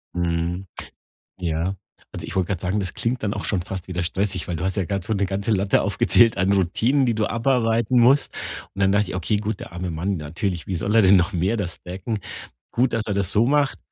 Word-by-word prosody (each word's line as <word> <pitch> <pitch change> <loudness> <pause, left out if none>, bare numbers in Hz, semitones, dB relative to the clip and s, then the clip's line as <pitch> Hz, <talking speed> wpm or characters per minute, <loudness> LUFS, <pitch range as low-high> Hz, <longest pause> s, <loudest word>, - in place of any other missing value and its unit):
Mhm. 85 +2 -1 0.7
Ja. 85 +2 -1 0.3
Also, - - -7
ich - - -7
wollte 95 -2 +2
grad 95 -4 -2
sagen, 95 +3 0
das 90 -2 -4
klingt 125 +2 -2
dann 105 -1 -1
auch - - -5
schon 95 -4 0
fast 95 -1 -6
wieder 90 -2 -3
stressig, 95 +2 -1
weil 85 - -2
du 80 - -4
hast 95 0 -1
ja 95 - +1
grad 100 0 -2
so 110 - -2
'ne 100 -1 +1
ganze 100 +3 -2
Latte 100 -2 +2
aufgezählt 115 -5 +3
an 95 +2 +2
Routinen, 105 +9 +2
die 120 -2 +1
du 110 0 0
abarbeiten 115 -1 +2
musst, 135 +5 +4 0.4
und 100 - -6
dann 95 0 +4
dachte 105 -1 +2
ich: - - -5
„Okay, 95 +4 0
gut, 105 0 -3
der - - -9
arme 90 +1 -4
Mann 90 +4 -2
natürlich, 85 +3 -3
wie 95 - -3
soll 100 +5 -1
er 115 - +6
denn 95 +1 +7
noch 90 +2 +2
mehr 95 +7 +1
das 90 -4 -4
decken? 95 +5 -4 0.5
Gut, 125 +1 +2
dass 115 -1 -1
er 105 - -1
das 100 -2 0
so 110 - +4
macht, 145 0 +2
100 Hz, 235 wpm, -23 LUFS, 90-110 Hz, 0.7 s, denn